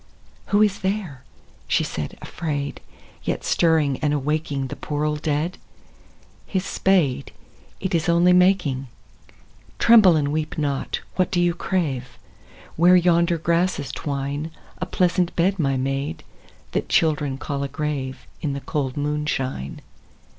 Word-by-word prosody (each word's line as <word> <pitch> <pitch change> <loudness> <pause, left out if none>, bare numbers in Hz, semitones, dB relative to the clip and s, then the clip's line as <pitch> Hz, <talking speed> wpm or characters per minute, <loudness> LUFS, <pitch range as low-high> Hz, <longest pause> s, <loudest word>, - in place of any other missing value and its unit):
II. - - -31 0.2
Who 205 - +5
is 205 -2 +1
there, 190 -9 -3 0.4
she - - +2
said - - -5
afraid, 145 -4 -4 0.4
yet - - -2
Stirring 160 -5 +2
and 150 -1 +1
awaking 145 -1 -1
The - - -5
poor 150 0 -2
old 150 -1 -1
dead? 155 +3 -1 0.9
His 190 -1 -1
spade, 160 -9 +1 0.5
it 190 - -3
Is 165 0 +1
only 170 +2 +5
making, 180 -8 +3 0.5
— - - -29
(Tremble 215 -7 +7
and 145 -2 +1
weep 155 +2 -2
not 140 -3 -1
I - - -29
What 185 - +2
do 180 - 0
you 175 0 +3
crave 155 -9 -2 0.3
?) - - -22
Where 175 +3 +6
yonder 170 -1 +3
grasses 165 -4 0
twine, 140 +2 -3 0.3
A - - -3
pleasant 180 -2 +1
bed, 185 +3 +2
my 135 -4 +1
maid, 135 +2 -2 0.5
that - - -2
Children 150 -4 +2
call 140 0 -4
a 140 - -1
grave, 135 -3 -4 0.2
In 145 -3 -1
the 140 - -4
cold 135 0 -2
moonshine. 145 - -2
150 Hz, 145 wpm, -23 LUFS, 140-175 Hz, 0.9 s, Tremble